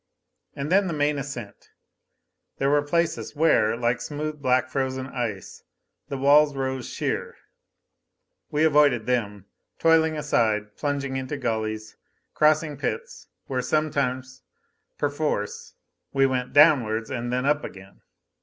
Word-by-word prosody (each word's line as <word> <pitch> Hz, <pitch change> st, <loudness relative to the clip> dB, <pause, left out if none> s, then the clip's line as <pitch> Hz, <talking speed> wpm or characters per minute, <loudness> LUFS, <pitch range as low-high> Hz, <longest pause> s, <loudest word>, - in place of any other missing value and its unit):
And 140 Hz, +3 st, -4 dB
then 195 Hz, +1 st, +4 dB
the 170 Hz, -, -2 dB
main 145 Hz, -1 st, 0 dB
ascent. 130 Hz, -6 st, -8 dB, 0.9 s
There 135 Hz, +1 st, +1 dB
were 145 Hz, 0 st, +4 dB
places 165 Hz, +2 st, -1 dB
where, 145 Hz, -8 st, +3 dB
like 120 Hz, 0 st, 0 dB
smooth 150 Hz, 0 st, -5 dB
black 130 Hz, -1 st, +2 dB
frozen 130 Hz, -1 st, -2 dB
ice, 120 Hz, -7 st, -5 dB, 0.5 s
the 140 Hz, -, -3 dB
walls 145 Hz, +2 st, +5 dB
rose 130 Hz, -1 st, -3 dB
sheer. -, -, -3 dB, 1.1 s
We 150 Hz, +1 st, +1 dB
avoided 145 Hz, -7 st, +4 dB
them, 105 Hz, -6 st, -2 dB, 0.3 s
toiling 160 Hz, -1 st, +3 dB
aside, 110 Hz, -8 st, 0 dB
plunging 140 Hz, -2 st, -2 dB
into 130 Hz, +2 st, -4 dB
gullies, 110 Hz, -3 st, -3 dB, 0.4 s
crossing 155 Hz, -1 st, +2 dB
pits 470 Hz, +1 st, -5 dB, 0.2 s
where 130 Hz, -2 st, -2 dB
sometimes, 130 Hz, -4 st, -1 dB, 0.6 s
perforce, 145 Hz, -8 st, -2 dB, 0.4 s
we 135 Hz, 0 st, +4 dB
went 125 Hz, -1 st, -1 dB
downwards, 125 Hz, -7 st, +4 dB
and 120 Hz, -1 st, -3 dB
then 125 Hz, +1 st, -1 dB
up 145 Hz, +1 st, +2 dB
again. 95 Hz, 0 st, -11 dB
135 Hz, 125 wpm, -25 LUFS, 120-150 Hz, 1.1 s, walls